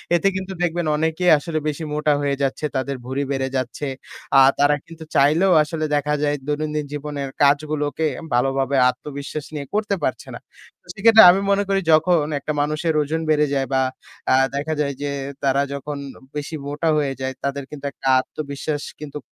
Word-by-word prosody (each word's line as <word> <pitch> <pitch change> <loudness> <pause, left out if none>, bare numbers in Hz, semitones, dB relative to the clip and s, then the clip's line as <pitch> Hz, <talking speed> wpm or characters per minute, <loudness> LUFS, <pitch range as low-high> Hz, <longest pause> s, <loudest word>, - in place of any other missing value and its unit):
এতে 185 +4 +2
কিন্তু 190 0 -4
দেখবেন 175 -1 0
অনেকেই 160 +3 +2
আসলে 155 +2 -3
বেশি 150 +2 -3
মোটা 150 0 +2
হয়ে 140 -1 0
যাচ্ছে। 140 +2 -1
তাদের 135 +1 -1
ভুড়ি 135 +2 -2
বেড়ে 135 -1 -1
যাচ্ছে। 130 +3 -3 0.5
আ - - +9 0.2
তারা 145 +1 +4
কিন্তু 165 -1 -11
চাইলেও 165 +7 +4
আসলে 150 - -11 0.2
দেখা 150 +1 0
যায় 145 0 +1
দৈনন্দিন 150 0 -2
জীবনের 145 -2 -4
কাজগুলোকে 150 +2 +1 0.3
ভালোভাবে 135 +2 +1
আত্মবিশ্বাস 140 +2 -6
নিয়ে 145 -2 -4
করতে 210 -1 0
পারছে - - -2
না। - - -8 0.5
সেক্ষেত্রে 220 +2 +7
আমি 195 +2 +1
মনে 200 +1 +3
করি 195 0 +2
যখন 160 0 +4 0.2
একটা 150 - -3
মানুষের 155 +2 0
ওজন 160 +3 -2
বেড়ে 150 -1 +3
যায় 135 -2 0
বা 130 - +3 0.5
আ - - +6 0.2
দেখা 150 +3 -2
যায় 140 -1 -1
যে 145 -1 -2 0.3
তারা 135 0 +2
যখন 145 +1 -5 0.4
বেশি 150 +2 -4
মোটা 150 +3 -1
হয়ে 140 -2 0
যায়, 130 0 -2
তাদের 140 0 -2
কিন্তু 145 -1 -9
একটা 135 - -7
আত্মবিশ্বাস 145 +1 -4 0.2
কিন্তু 150 -1 -7
150 Hz, 170 wpm, -21 LUFS, 140-160 Hz, 0.5 s, আ